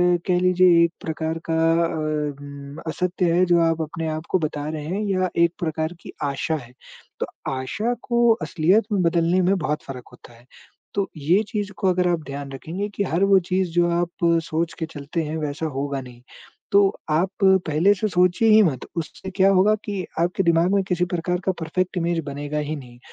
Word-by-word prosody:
अ, - - +1
कह 180 -1 +3
लीजिए 180 -2 +5
एक 170 - -3
प्रकार 160 0 -3
का 160 - +1 0.3
अ, 150 -3 -2
उम, 140 0 -9
असत्य 180 +1 0
है 180 +1 +4
जो 175 -1 +4
आप 165 0 -1
अपने 160 +1 -4
आप 160 - -8
को 185 - +2
बता 150 -2 -3
रहे 155 -1 -5
हैं 190 +6 -2
या 185 -1 +1 0.2
एक 170 - -2
प्रकार 160 0 -2
की - - -10 0.2
आशा 160 +4 -2
है, 120 - -18 0.5
तो - - 0 0.3
आशा 210 - -2
को 235 -1 +3
असलियत 185 +7 +2
में 195 - +2
बदलने 170 +2 +2
में 185 +2 +2
बहुत 150 -2 -2
फर्क 130 -3 -8
होता 120 - -16
है। 120 +1 -20 0.5
तो 200 -1 0
ये 165 +7 +3
चीज़ 205 -1 -3
को 195 - 0
अगर 180 0 +2
आप 170 -2 +1
ध्यान 140 0 -6
रखेंगे 170 +9 -4
कि 200 - 0
हर 180 0 0
वो 195 - +7
चीज़ 185 -1 0
जो 175 0 +2
आप 170 0 -1 0.2
सोच 165 +1 -2
के 160 - -1
चलते 160 +2 -4
हैं, 155 +1 -4
वैसा 150 +1 -3
होगा 140 0 -2
नहीं, 125 -1 -13 0.5
तो 200 - +6 0.3
आप 180 +5 +2
पहले 190 0 +4
से 215 +3 -1
सोचिए 180 +5 +3
ही 215 0 +7
मत, 140 -9 -1
उससे 165 +4 -5
क्या 195 +1 +4
होगा 195 +3 +4
कि 195 -4 -3
आपके 175 +3 +1
दिमाग 170 +3 +3
में 195 - +2
किसी 180 -1 0
प्रकार 180 +1 -1
का 190 - +3
परफेक्ट 185 +3 -2
इमेज़ 170 -1 0
बनेगा 145 +1 -4
ही 150 +1 -3
नहीं। 120 -3 -13
170 Hz, 200 wpm, -23 LUFS, 150-185 Hz, 0.5 s, वो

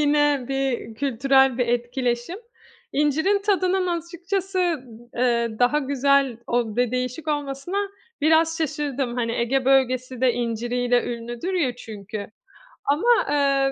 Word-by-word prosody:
Yine 290 -2 +3
bir 270 -4 -2
kültürel 265 0 +2
bir 245 - +2
etkileşim. 245 +5 -1 0.6
İncirin 315 +8 +2
tadının 375 -2 +1
açıkçası, 350 +3 -3 0.6
eee, 235 -1 +2
daha 250 +4 +3
güzel 275 -3 +2
o 240 -2 0
bir 210 - -9
de 245 -1 +2
değişik 255 +5 -3
olmasına 290 +4 -3 0.4
biraz 320 +1 +3
şaşırdım. 285 -5 -2
Hani, 230 -2 -1
Ege 250 +3 0
Bölgesi 255 -1 +2
de 255 -2 +4
inciriyle 240 +1 0
ünlüdür 240 +8 -4
ya 260 -9 0
çünkü 210 -3 -7 0.6
ama, 295 +11 +1 0.2
eee, 275 -2 +2
270 Hz, 125 wpm, -23 LUFS, 245-295 Hz, 0.6 s, de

